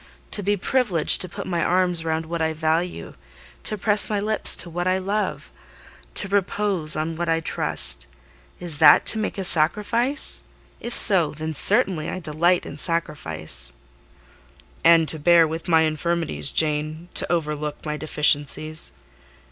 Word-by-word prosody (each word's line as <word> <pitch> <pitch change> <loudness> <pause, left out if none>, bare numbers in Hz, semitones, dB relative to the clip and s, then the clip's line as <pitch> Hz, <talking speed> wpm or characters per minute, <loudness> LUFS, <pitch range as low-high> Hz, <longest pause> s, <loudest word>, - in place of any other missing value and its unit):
To - - +2
be 205 +1 0
privileged 200 - 0
to 185 - -2
put 200 +3 -8
my 170 -3 -2
arms 180 -2 +1
round 160 0 -2
what 170 +1 -5
I 160 0 0
value—to 165 +6 -4
press 210 +1 +3
my 210 -2 -1
lips 215 +1 +4
to - - -3
what 175 +2 -4
I 185 0 +1
love—to 200 0 -5
repose 195 -4 -1
on 160 +1 -3
what 170 +1 -3
I 165 0 +1
trust: 65 - 0 0.5
is 170 -4 -5
that 150 -2 +6
to 220 - +5
make 215 - -4
a 195 - -3
sacrifice? 210 - -1 0.4
If 235 - -4
so, 180 -8 +5
then 155 +1 -5
certainly 190 - +2
I - - -5
delight 170 +1 0
in 145 - -9
sacrifice." 80 - -4 1.1
"And 165 -1 +5
to 160 - +1
bear 170 +1 +4
with 160 +1 -6
my 165 -2 +4
infirmities, 155 - -1
Jane: 155 +2 -2
to - - +3
overlook 150 -3 -3
my 150 -1 -3
deficiencies." 150 +1 0
165 Hz, 150 wpm, -22 LUFS, 155-185 Hz, 1.1 s, that